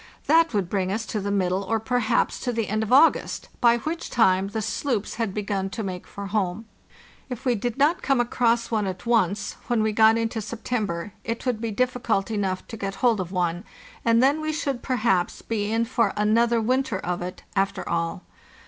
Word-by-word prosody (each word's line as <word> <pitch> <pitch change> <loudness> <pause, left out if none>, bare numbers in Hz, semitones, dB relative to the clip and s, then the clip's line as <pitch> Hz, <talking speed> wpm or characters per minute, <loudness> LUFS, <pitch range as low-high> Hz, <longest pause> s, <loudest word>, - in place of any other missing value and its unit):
That 330 +2 +4
would 200 -4 0
bring 190 0 -1
us 220 +2 -2
to 215 - -3
the 200 0 -3
middle 190 -1 +1
or 225 +3 0
perhaps 235 0 0
to 245 - -2
the 230 -2 -1
end 215 +1 0
of 220 - -3
August, 285 +6 +4
by 235 -1 +5
which 320 +8 -4
time 190 -5 +3
the 210 +2 -3
sloops 220 +1 -2
had 225 -3 0
begun 195 -1 -2
to 220 +3 -5
make 185 -2 -5
for 200 - -7
home. 200 0 -1 0.6
If 250 +1 -6
we 250 - +3
did 235 +2 -3
not 310 +6 +3
come 275 -3 +2
across 235 -1 +1
one 215 -3 +1
at 185 +3 -6
once, 205 -3 +1
when 235 -3 +1
we 220 - +1
got 220 +1 +5
into 225 0 -1
September 210 -5 -3
it 230 +2 -4
would 245 -4 -1
be 230 - -2
difficult 235 -2 0
enough 195 -3 -1
to 225 - -6
get 195 -1 -4
hold 230 -4 +4
of 180 -1 -4
one, 175 -1 -1 0.4
and 230 +1 +4
then 285 +4 +3
we 310 0 -1
should 280 -5 -2
perhaps 215 -8 0
be 210 -2 -2
in 230 +1 +1
for 230 -4 +1
another 230 +3 +3
winter 255 -1 0
of 180 -1 -3
it, 180 +1 -6
after 195 0 0
all. 170 +2 -2
220 Hz, 200 wpm, -25 LUFS, 195-240 Hz, 0.6 s, by